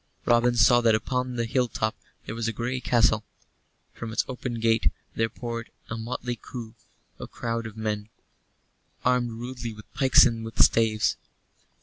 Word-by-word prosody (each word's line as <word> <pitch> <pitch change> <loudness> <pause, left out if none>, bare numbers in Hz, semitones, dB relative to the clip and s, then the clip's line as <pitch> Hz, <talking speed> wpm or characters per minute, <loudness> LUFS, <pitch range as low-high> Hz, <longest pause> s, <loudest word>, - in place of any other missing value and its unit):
Robin 120 +1 +4
saw 120 +1 +6
that 115 -2 +4
upon 125 +3 -2
the 115 -1 0
hill 125 +2 +1
top 110 -1 -2 0.3
there - - -5
was 115 0 -2
a - - 0
grey 120 +4 -2
castle. 115 -3 +3 0.7
From 115 -1 -6
its 110 - +1
open 125 -2 -4
gate 115 0 +3 0.2
there 115 0 0
poured 115 -1 -5 0.2
out - - 0
a - - -4
motley 120 0 -4 0.9
crowd 115 -1 -3
of 110 0 -11
men 105 -1 -3 1.0
armed 125 -1 +3
rudely 120 0 -6
with 105 - -15
pikes 130 -2 +6
and 115 -2 -1
with 115 0 -8
staves. 110 -2 +3
115 Hz, 155 wpm, -26 LUFS, 110-125 Hz, 1.0 s, saw